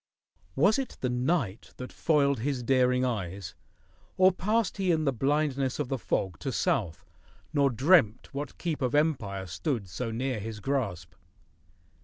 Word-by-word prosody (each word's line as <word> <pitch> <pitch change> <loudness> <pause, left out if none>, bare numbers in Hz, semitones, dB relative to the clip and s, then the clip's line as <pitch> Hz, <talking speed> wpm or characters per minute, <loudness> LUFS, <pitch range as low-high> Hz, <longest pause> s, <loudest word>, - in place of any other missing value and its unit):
Was 200 - +4
it 270 - -5
the 125 - 0
night 125 - -1
that 125 - -8
foiled 140 -5 +2
his 130 +1 -2
daring 125 0 +3
eyes, 95 -6 -4 0.6
Or 185 0 +6
passed 210 +5 0
he 190 -2 0
in 160 -2 +2
the 135 - +2
blindness 135 +1 0
of 145 -4 -3
the 135 - -2
fog 95 -6 -2
To - - -3
south, 85 +2 -1 0.5
nor 140 -2 +3
dreamt 130 - +3
what 145 +2 -5
keep 165 -4 -3
of 130 +1 0
empire 125 -11 0
stood 100 - -3
So 115 +7 -4
near 125 +1 -2
his 110 +1 -6
grasp? 100 - -2
130 Hz, 155 wpm, -28 LUFS, 110-150 Hz, 0.6 s, Or